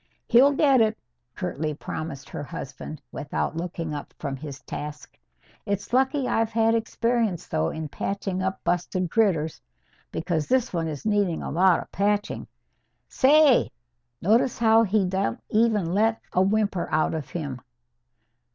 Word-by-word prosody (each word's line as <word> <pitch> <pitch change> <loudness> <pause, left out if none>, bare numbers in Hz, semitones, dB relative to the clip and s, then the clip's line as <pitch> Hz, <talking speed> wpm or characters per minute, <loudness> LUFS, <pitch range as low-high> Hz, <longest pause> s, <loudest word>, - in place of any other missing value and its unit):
"He'll 265 +4 +6
get 275 -3 +4
it," 220 0 +2 0.4
curtly 155 -4 -3
promised 155 -2 -6
her - - -5
husband, 145 +1 -7
without 145 +2 -3
looking 165 -2 -4
up 145 - -7
from 140 -3 -4
his 140 -1 -8
task. 150 +1 -7 0.5
"It's 200 +3 -3
lucky 265 +1 +2
I've 225 -2 +1
had 225 0 +2
experience, 230 -4 0
though, 80 +1 0
in 160 -1 -5
patching 195 +4 -3
up 190 0 -2
busted 180 0 -1
critters. 170 -9 +1 0.5
Because 165 -3 -2
this 255 -3 +1
one 165 -2 -1
is 150 +1 -6
needing 205 -6 +1
a - - -4
lot 180 +2 +4
of - - -24
patching. 205 +2 -1 0.6
Say! 290 -1 +5 0.5
Notice 230 +6 +3
how 225 0 +5
he 210 -2 +2
don't 185 -11 -1
even 210 -6 +2
let 220 +3 +2
a 185 - +3
whimper 200 -2 +1
out 155 - +2
of 155 -4 -4
him? 140 -7 -5
190 Hz, 145 wpm, -25 LUFS, 160-225 Hz, 0.6 s, He'll